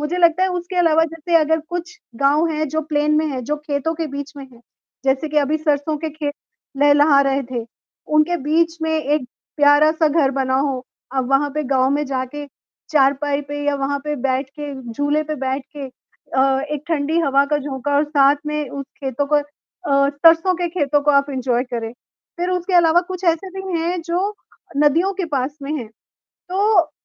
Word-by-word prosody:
मुझे 300 +4 -2
लगता 340 +1 +4
है 375 - +3
उसके 360 0 -4
अलावा 325 -2 +4
जैसे 330 +1 0
अगर 320 0 +2
कुछ 355 0 -5 0.3
गाँव 295 +4 +4
हैं 310 -1 -1
जो 315 +3 -1
प्लेन 300 0 +1
में 315 - +1
है 270 -4 -3
जो 300 +5 -2
खेतों 300 +1 -2
के 325 0 -3
बीच 285 0 -6
में 280 - -7
है, 235 - -18 0.4
जैसे 270 +3 +1
कि 300 - -5
अभी 295 +1 +1
सरसों 300 0 0
के 320 +1 -4
खेत 295 -1 -4 0.4
लेह 290 +1 +5
लहा 290 -1 +5
रहे 275 0 +1
थे, 240 -2 -5 0.4
उनके 305 +3 +2
बीच 325 +3 +1
में 320 - 0
एक 305 -3 0 0.3
प्यारा 290 +1 +5
सा 320 -1 +2
घर 295 -3 +2
बना 260 -1 0
हो। 270 -2 -1 0.3
अब 260 -1 0
वहाँ 280 +2 +2
पे 305 - -1
गाँव 260 -1 +2
में 290 +1 +1
जाके 265 +2 -4 0.4
चारपाई 285 0 +2
पे 290 0 -4
या 290 - +2
वहाँ 280 +1 -1
पे 300 0 -2
बैठ 265 0 0
के 295 -1 -5 0.2
झूले 290 +4 0
पे 305 0 -3
बैठ 265 -1 -2
के 280 -2 -5 0.5
अ, 265 0 +3
एक 300 -2 -3
ठंडी 315 0 0
हवा 275 -3 +3
का 295 - +3
झोंका 285 0 -3
और 290 - +3
साथ 285 -1 +4
में 300 -1 -2
उस 275 +2 -6 0.2
खेतों 270 +2 -1
को 300 +1 +2
अ, 290 0 -1
सरसों 330 +5 +4
के 350 0 -2
खेतों 295 -4 +1
को 295 - +3
आप 280 -1 +3
एन्जॉय 255 -2 0
करें। 230 -3 -5 0.5
फिर 355 +1 -1
उसके 360 +1 -1
अलावा 340 -1 +5
कुछ 370 0 -5
ऐसे 340 +3 +1
भी 375 -3 -3
हैं, 345 +2 -1
जो 360 +5 -1 0.4
नदियों 310 +7 +3
के 370 - -2
पास 270 +2 -1
में 280 +2 -4
हैं, 235 -4 -7 0.6
तो 380 -3 +3
295 Hz, 200 wpm, -20 LUFS, 275-325 Hz, 0.6 s, लेह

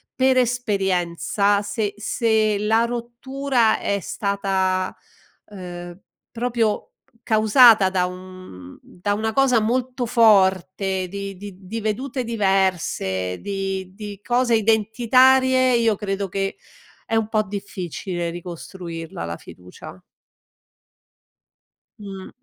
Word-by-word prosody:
per 260 0 +3
esperienza 200 -4 +1
se 205 0 -3
se 215 -1 +1
la 220 +2 +2
rottura 240 0 -1
è 200 - -1
stata, 190 -2 -1 0.5
ehm, 175 -3 -9 0.3
proprio 230 -2 -1 0.3
causata 220 -2 +6
da 185 -1 +1
un 180 - -10
da 205 +3 -3
una 220 +1 -2
cosa 265 -2 +4
molto 250 +3 -1
forte 190 -4 +3
di 200 +1 -6
di 190 0 -11
di 225 +5 -5
vedute 250 +5 -2
diverse 190 - 0
di 195 -2 -4
di 205 -1 -8
cose 245 0 +1
identitarie 255 +4 +4
io 230 -2 +2
credo 195 -1 -3
che 195 +1 -3 0.5
è 225 - -1
un 225 -1 +1
po' 215 -1 +2
difficile 190 -3 -5
ricostruirla 170 - -7
la 85 0 -5
fiducia. 90 +1 -13 2.0
Mh. 195 -2 -8
205 Hz, 100 wpm, -22 LUFS, 185-230 Hz, 2.0 s, causata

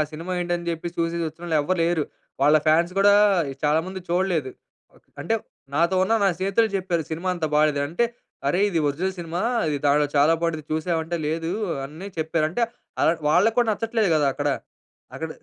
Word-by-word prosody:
Cinema 165 +4 -5
ఏంటని 175 -1 -2
చెప్పి 165 +1 -4
చూసి 165 0 0
వచ్చినోళ్ళు 165 +1 -3
ఎవ్వరు 185 +5 -1
లేరు. 165 -3 +1 0.4
వాళ్ళ 150 +2 +6
ఫాన్స్ 170 +3 +3
గూడా 200 +1 +6 0.5
చాలా 150 +2 +3
మంది 190 0 -6
చూడలేదు. 175 -6 0 0.4
ఓ - - -28 0.3
అంటే 225 - 0 0.4
నాతో 170 +5 +2
ఉన్న 190 - +1
నా 200 - +5
స్నేహితులే 195 +4 +2
చెప్పారు 180 -3 -1
సినిమా 165 +4 -3
అంత 170 -3 -3
బాలేదు. 150 -1 +3
అంటే, 175 +10 +1 0.4
"అరె! 175 +7 +2
ఇది 175 -5 0
ఒరిజినల్ 180 +7 -2
సినిమా 170 +1 -4 0.8
చాలా 145 +3 +5
బాంటుంది 165 -2 -2
చూసావంటే" 160 +1 -1
లేదు, 165 +2 -2 0.3
అన్నియ 155 +8 -8
చెప్పారంటే 160 +6 0 0.4
ఆహ్, 160 - +5 0.2
వాళ్ళక్కూడా 225 +9 +3
నచ్చట్లేదు 225 -1 0
కదా! 150 -2 +3
అక్కడ. 145 +1 -2 0.7
అక్కడ 160 - -4
170 Hz, 155 wpm, -24 LUFS, 155-185 Hz, 0.8 s, వాళ్ళ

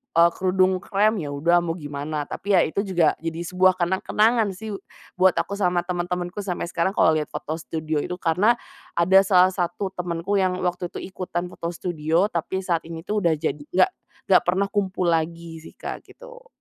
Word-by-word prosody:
eee, 170 +1 +6
kerudung 185 0 +2
krem, 210 +1 +1
ya 150 - -4
udah 170 +5 +3
mau 165 -1 -2
gimana. 145 -1 -4
Tapi 200 +6 -1
ya 175 - +5
itu 180 - -2
juga, 175 -5 +3
jadi 165 +1 -4
sebuah 185 +1 +3
kenang-kenangan 210 +5 +2
sih, 220 +2 -7 0.5
buat 185 -1 +5
aku 200 - -1
sama 180 -2 +1
teman-temanku 175 +1 -3
sampai 185 -4 -3
sekarang 190 +4 0
kalau 160 - +5
lihat 155 -1 0
foto 160 +2 -5
studio 155 -2 -3
itu, 180 - -3
karena, 185 +8 +3 0.4
ada 185 +3 +6
salah 185 -1 +5
satu 185 +1 -2
temanku 180 +3 -1
yang 185 -1 +1
waktu 180 0 -1
itu - - -7
ikutan 180 -1 -3
foto 170 - -5
studio, 165 0 0
tapi 185 +3 -2
saat 170 -3 +1
ini 165 -1 -7
tuh 210 0 0
udah 170 -3 +3
jadi 145 0 -2
nggak 360 - +3 0.4
nggak - - +7
pernah 190 +3 +1
kumpul 190 -3 0
lagi 165 0 -2
sih - - -14
Kak, - - -6
gitu. - - -14
180 Hz, 185 wpm, -23 LUFS, 165-190 Hz, 0.5 s, nggak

